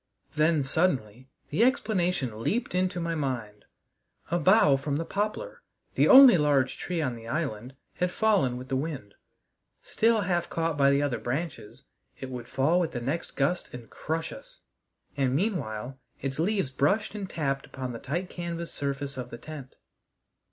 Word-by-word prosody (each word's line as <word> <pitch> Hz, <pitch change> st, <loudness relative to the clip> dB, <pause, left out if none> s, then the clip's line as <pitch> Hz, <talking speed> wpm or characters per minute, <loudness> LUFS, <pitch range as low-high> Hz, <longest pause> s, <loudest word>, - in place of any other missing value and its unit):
Then 155 Hz, -1 st, +2 dB
suddenly 130 Hz, -, 0 dB, 0.2 s
the 180 Hz, +10 st, +3 dB
explanation 180 Hz, -, 0 dB
leaped 220 Hz, -, -1 dB
into 185 Hz, 0 st, 0 dB
my 170 Hz, 0 st, -2 dB
mind: 125 Hz, -9 st, -4 dB, 0.7 s
a 175 Hz, -, +2 dB
bough 185 Hz, -4 st, +5 dB
from 140 Hz, +1 st, -2 dB
the 165 Hz, +3 st, -2 dB
poplar, 215 Hz, -, -3 dB, 0.3 s
the -, -, +3 dB
only 265 Hz, -, +9 dB
large 140 Hz, -3 st, +2 dB
tree 175 Hz, -3 st, -2 dB
on 130 Hz, -4 st, -2 dB
the 115 Hz, 0 st, -11 dB
island, 130 Hz, -3 st, -3 dB, 0.2 s
had 180 Hz, 0 st, 0 dB
fallen 195 Hz, -, +2 dB
with 130 Hz, +1 st, -9 dB
the 135 Hz, -, 0 dB
wind. 135 Hz, -7 st, -4 dB, 0.7 s
Still 225 Hz, -1 st, +2 dB
half 175 Hz, -3 st, -1 dB
caught 165 Hz, -1 st, -1 dB
by 140 Hz, -1 st, +4 dB
the 140 Hz, +1 st, +3 dB
other 130 Hz, -5 st, -1 dB
branches, 125 Hz, -4 st, -5 dB, 0.4 s
it 130 Hz, -, -6 dB
would 120 Hz, -2 st, -6 dB
fall 140 Hz, +7 st, +2 dB
with 170 Hz, -3 st, -1 dB
the 120 Hz, -, -2 dB
next 140 Hz, +8 st, -3 dB
gust 150 Hz, +6 st, 0 dB
and 120 Hz, -2 st, -10 dB
crush 160 Hz, +1 st, -3 dB
us, -, -, -13 dB, 0.5 s
and 135 Hz, -2 st, +1 dB
meanwhile 135 Hz, -, -2 dB, 0.2 s
its 135 Hz, +1 st, -4 dB
leaves 190 Hz, -5 st, 0 dB
brushed 195 Hz, +13 st, +1 dB
and 200 Hz, -3 st, -5 dB
tapped 140 Hz, -4 st, -2 dB
upon 130 Hz, -2 st, -5 dB
the 115 Hz, -, -6 dB
tight 170 Hz, +9 st, -3 dB
canvas 170 Hz, -1 st, -5 dB
surface 140 Hz, -1 st, -3 dB
of 125 Hz, -1 st, -5 dB
the 120 Hz, -, -8 dB
tent. 140 Hz, -1 st, -10 dB
145 Hz, 165 wpm, -28 LUFS, 130-175 Hz, 0.7 s, only